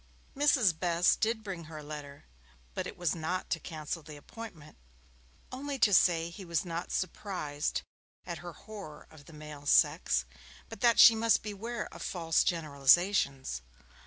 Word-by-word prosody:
Mrs. 255 - +3
Best 175 0 +2
did 220 0 0
bring 185 -5 -6
her 155 0 -9
a 150 - -8
letter, 145 -1 -9 0.5
but - - -3
it - - -9
was 175 -4 0
not 170 +2 -3
to 165 - 0
cancel 160 0 -5
the 150 0 -11
appointment, 165 -2 -11 0.8
only 275 +2 -4
to 215 -4 +4
say 170 -2 +4
he 190 +3 -9
was 170 -1 -1
not 170 0 -4
surprised 165 -6 -3 0.4
at - - -5
her - - -8
horror 200 -9 -10
of 150 -2 -15
the - - -14
male 150 -1 -10
sex, 60 - +3 0.4
but - - -10
that 235 -2 +4
she 230 - +10
must 225 -1 +2
beware 215 +3 -4
of - - -10
false 165 -3 +1
generalizations. 140 - +2
170 Hz, 160 wpm, -31 LUFS, 150-205 Hz, 0.8 s, she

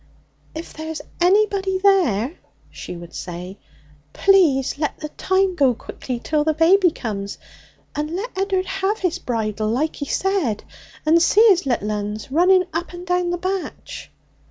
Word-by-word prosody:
'If 320 +2 -7
there's 315 0 -5 0.2
anybody 390 0 +3
there,' 345 - +2 0.4
she - - -8
would 170 0 -11
say, 180 +2 -7 0.5
'please 315 -10 +3
let 300 - -2
the 305 - -5
time 380 +3 +1
go 275 -7 +3
quickly 250 +2 -6
till 300 +4 0
the 310 0 +1
baby 355 +4 +5
comes, 200 -9 -5 0.6
and 300 +1 -2
let 435 +6 -5
Ed'ard 380 -1 0
have 390 +2 -1
his 360 -2 -1
bridal 215 - -2
like 265 +8 -1
he 285 - -4
said, 350 - 0 0.4
and 330 +2 +5
see 415 +6 +5
his 360 -7 +3
little 215 -4 0
uns 210 +3 -4
running 365 +5 +5
up 345 +2 -3
and 350 0 -8
down 360 0 0
the 350 - -1
batch.' 370 +1 -5
330 Hz, 155 wpm, -21 LUFS, 250-380 Hz, 0.6 s, baby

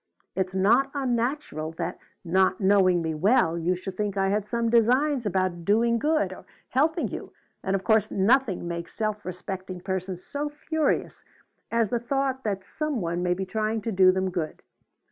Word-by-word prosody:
It's 190 0 -1
not 235 +8 +4
unnatural 240 - -1
that, 170 +2 -4 0.3
not 185 +2 +2
knowing 190 -3 +4
me 160 0 -1
well, 170 0 +3
you 170 +2 0
should 185 +1 -7
think 205 -2 -2
I 195 0 +2
had 205 +1 0
some 235 +1 0
designs 245 +3 +3
about 185 -3 -1
'doing 230 +4 +3
good,' 310 +3 +1
or - - -12 0.3
helping 315 +6 +1
you, - - -7 0.3
and 190 0 0
of 190 - -2
course 220 0 +3
nothing 205 -2 +2
makes 170 0 -5
self 215 -2 -2
respecting 185 0 -6
persons 185 -1 -4
so 290 +1 -3
furious 305 +1 -1 0.5
as 230 -2 +1
the 240 - +1
thought 265 +2 -1
that 195 -3 -2
some 305 0 -3
one 170 -1 -2
may 180 0 +1
be 190 +1 -3
trying 215 +3 -1
to 225 - -2
do 185 -2 +6
them 190 0 -1
good. 165 -3 -4
200 Hz, 175 wpm, -26 LUFS, 185-240 Hz, 0.5 s, do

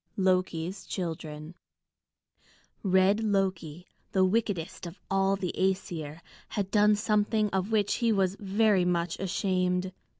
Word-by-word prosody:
LOKI'S 185 -1 0
CHILDREN 160 -3 -5 1.3
Red 195 +2 +3
Loki, 185 -5 -1 0.3
the 190 -1 +4
wickedest 190 -5 -1
of 170 +3 -11
all 195 0 +2
the 190 -3 -3
Æsir, 165 -5 -2 0.3
had 200 -2 -3
done 210 0 +5
something 210 0 +1
of 190 +2 -1
which 210 -2 +2
he 235 -1 +2
was 195 -2 +1
very 205 -1 +2
much 175 -1 -1
ashamed. 185 -1 0
190 Hz, 120 wpm, -28 LUFS, 180-205 Hz, 1.3 s, done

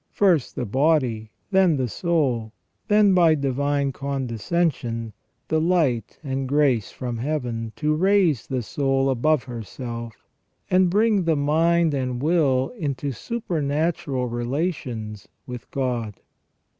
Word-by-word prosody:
First 180 -9 +2
the 125 - -2
body, 125 -3 +1 0.2
then 190 -5 +4
the 130 -2 0
soul, 125 - -1 0.3
then 210 -2 +5
by 170 -3 +5
divine 140 0 0
condescension 125 -2 -2 0.3
the 160 0 +1
light 155 - +1
and 135 -2 -3
grace 140 -7 +2
from 120 -2 -5
Heaven, 120 -4 -3
to 150 0 0
raise 180 - +2
the 130 -3 -2
soul 135 +2 0
above 145 +3 +2
herself, 115 -1 -7 0.5
and 185 0 +4
bring 205 -1 +2
the 165 -1 +3
mind 160 +3 +2
and 130 -3 -2
will 140 -4 +2
into 145 - -3
supernatural 155 - -2
relations 120 - -3 0.2
with 125 -2 -8
God. 120 -6 -3
140 Hz, 120 wpm, -23 LUFS, 120-165 Hz, 0.5 s, then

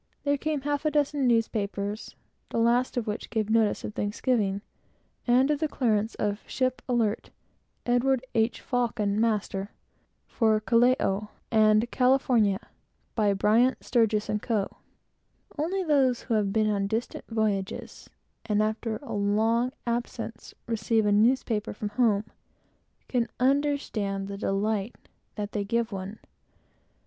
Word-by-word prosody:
Then 285 -1 +1
came 305 -1 -1
a - - -21
half 290 0 -1
a 305 - +2
dozen 290 -2 +1
newspapers, 210 -3 -1 0.3
the - - -3
last 240 +3 +2
of 240 - 0
which 210 0 -4
gave 220 -2 -1
notice 225 -2 +2
of 210 - -5
Thanksgiving, 205 -1 0 0.6
and 255 +4 +4
of 295 - 0
the 315 - +1
clearance 225 -6 0
of 205 +1 -2
"ship 255 -1 -1
Alert, 230 -4 0 0.6
Edward 250 +1 +2
H. 225 0 +1
Faucon, 230 -5 0
master, 210 -3 0 0.6
for 220 -2 +2
Callao 230 -3 +2 0.2
and 215 +1 +4
California, 250 -6 +2 0.5
by 210 -3 +2
Bryant, 230 +6 +3
Sturgis 220 -3 +2
& - - -9
Co." 215 -5 -2 0.8
No 300 0 -1
one - - -5 0.2
has 265 -4 +3
ever 215 -4 +1
been 215 +2 +1
on 200 -2 0
distant 225 +4 -3
voyages, 210 -4 -2 0.4
and 210 -1 +2
after 220 +1 -2
a - - -6
long 220 +4 +1
absence 235 -1 -4
received 225 -1 +1
a 205 - +3
newspaper 220 0 +2
from 210 0 -4
home, 210 -2 +2
who 215 - -35
cannot 240 -2 0
understand 255 -8 0
the 200 0 -6
delight 205 +3 -1 0.4
that 210 -1 -4
they 205 - -1
give 230 +2 -1
one. 195 +2 -6
225 Hz, 135 wpm, -27 LUFS, 210-245 Hz, 0.8 s, and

